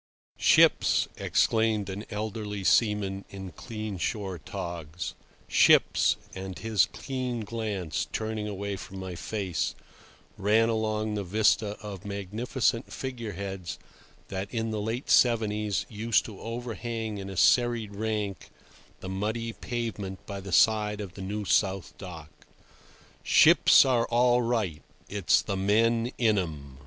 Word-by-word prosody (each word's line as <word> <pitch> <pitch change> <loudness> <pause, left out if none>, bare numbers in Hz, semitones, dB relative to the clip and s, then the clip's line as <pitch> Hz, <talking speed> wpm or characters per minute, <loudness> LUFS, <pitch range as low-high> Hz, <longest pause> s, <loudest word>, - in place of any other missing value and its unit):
"Ships!" - - +5
exclaimed 110 -3 +2
an 100 +2 -5
elderly 105 -1 -4
seaman 100 -2 +2
in 95 -2 -8
clean 110 - -6
shore 95 +3 -2
togs. 85 +1 -6 0.3
"Ships"—and 95 0 +3
his 110 -5 +2
keen 130 -3 -4
glance, 105 -7 -3
turning 110 -1 -3
away 100 -1 -4
from 95 - -9
my 95 -1 -5
face, 95 0 -2 0.6
ran 110 +3 +3
along 110 -1 -1
the 105 -1 -2
vista 105 +2 +2
of 100 -3 -7
magnificent 110 +5 -1
figure 120 -5 -5
heads 95 -1 -5 0.5
that 95 +1 -4
in 115 -2 -2
the 105 -1 -2
late 115 +5 -3
seventies 105 -4 +3
used 110 0 +1
to 105 -4 -9
overhang 115 -2 -4
in 100 0 -6
a 95 - -7
serried 120 -3 +3
rank 105 -3 -3 0.5
the 95 - -6
muddy 110 +4 -2
pavement 110 -7 -5
by 100 -1 -6
the 95 0 -8
side 105 +5 +3
of 100 -4 -6
the 95 - -9
New 105 +2 -4
South 95 -1 +1
Dock—"ships 80 - +2
are 120 -3 +2
all 120 +1 +3
right; 110 -10 -1 0.3
it's 100 -3 +2
the 100 - -2
men 115 +4 +2
in 110 -4 +3
'em. 70 -6 -6
105 Hz, 125 wpm, -28 LUFS, 95-115 Hz, 0.6 s, Ships